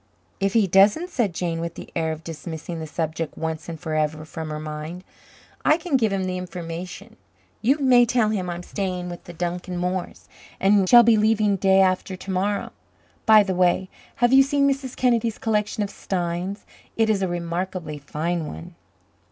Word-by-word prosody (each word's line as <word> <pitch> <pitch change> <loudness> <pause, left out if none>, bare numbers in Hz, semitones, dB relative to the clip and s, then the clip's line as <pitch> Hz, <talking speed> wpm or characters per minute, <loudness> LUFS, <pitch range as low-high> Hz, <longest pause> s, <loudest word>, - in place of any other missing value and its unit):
"If 195 0 0
he 225 -3 +4
doesn't," 205 - +4
said 230 -7 0
Jane, 170 -1 -2
with 170 0 -4
the - - -10
air 160 -1 0
of 160 +1 -6
dismissing 165 +1 -6
the 160 - -5
subject 160 0 -3
once 160 0 -4
and 165 -2 -6
forever 155 -1 -2
from 160 0 -6
her 150 0 -4
mind, 155 +3 -6 0.6
"I 305 - +4
can 335 -3 -2
give 225 -5 +2
him 195 -1 -1
the 185 0 -2
information. 175 0 -7 0.4
You 265 +6 +3
may 250 -4 +5
tell 230 -2 +2
him 190 -4 -2
I'm 175 0 -5
staying 180 -2 -3
with 175 - -9
the 175 - -9
Duncan 175 +1 -4
Moores, 180 +1 -3 0.3
and 195 -1 +3
shall 240 -1 +9
be 225 -1 +5
leaving 215 -1 +3
day 190 0 +4
after 185 0 +1
to 190 +1 -7
morrow. 200 +2 -1 0.6
By 215 -1 +8
the 190 -1 -2
way, 180 +1 +2 0.3
have 240 +1 +2
you 270 - +9
seen 280 +1 +2
Mrs. 270 -2 -2
Kennedy's 235 -3 +1
collection 210 -1 0
of 200 - -4
steins? 180 +2 -3 0.3
It 225 -1 +3
is 210 -3 +1
a 190 - +1
remarkably 175 -2 -4
fine 160 +3 -3
one." 80 - -9
185 Hz, 185 wpm, -23 LUFS, 170-215 Hz, 0.6 s, shall